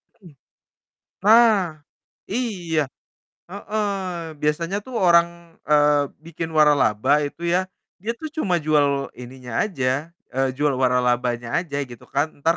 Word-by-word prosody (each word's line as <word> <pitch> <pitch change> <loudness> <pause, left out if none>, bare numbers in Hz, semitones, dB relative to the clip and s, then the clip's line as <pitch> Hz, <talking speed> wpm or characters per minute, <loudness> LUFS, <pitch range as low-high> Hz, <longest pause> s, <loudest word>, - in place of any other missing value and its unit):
Mhm. 180 -6 -16 0.9
Nah, 210 -7 +5 0.5
iya. 185 -9 -1 0.7
Heeh, 205 +2 -3 0.5
biasanya 165 +5 0
tuh 260 - -10
orang, 170 -1 +2
eee, 145 -1 +4 0.2
bikin 165 0 -5
waralaba, 145 -2 +3
itu 145 +4 -7
ya, 180 +2 +2 0.4
dia 225 +3 -1
tuh 315 - -4
cuma 180 - +1
jual 145 -2 +1
ininya 125 0 -10
aja, 145 -3 -2 0.2
eee, 135 0 +1
jual 145 0 +1
waralabanya 125 -2 +1
aja, 165 -5 -4
gitu 120 -2 -12
kan. 145 +2 +2 0.2
Ntar 165 +1 +3
155 Hz, 120 wpm, -22 LUFS, 135-180 Hz, 0.9 s, Nah